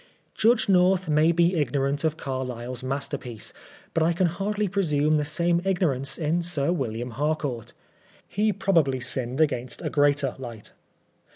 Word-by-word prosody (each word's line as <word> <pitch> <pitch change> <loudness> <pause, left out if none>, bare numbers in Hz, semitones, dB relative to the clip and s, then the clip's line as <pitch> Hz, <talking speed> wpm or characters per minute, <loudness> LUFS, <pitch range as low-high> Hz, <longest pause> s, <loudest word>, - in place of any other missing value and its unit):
Judge 230 +1 +3
North 185 -1 +3
may 155 +2 +4
be 170 +2 +3
ignorant 140 -1 0
of 160 -1 0
Carlyle's 125 -2 -4
masterpiece, 130 -3 -4 0.4
but 165 - +1
I 165 +2 +3
can 180 +2 +1
hardly 200 +5 -1
presume 155 -6 +1
the 150 - 0
same 170 +3 +1
ignorance 140 -9 0
in 165 +2 0
Sir 170 -3 0
William 125 -6 -3
Harcoart. 145 -2 -2 0.5
He 215 +2 +1
probably 175 -10 +2
Binned 125 +1 -2
against 130 -6 0
a - - -2
greater 145 -2 +2
light. 120 -5 -8
150 Hz, 145 wpm, -25 LUFS, 130-175 Hz, 0.5 s, may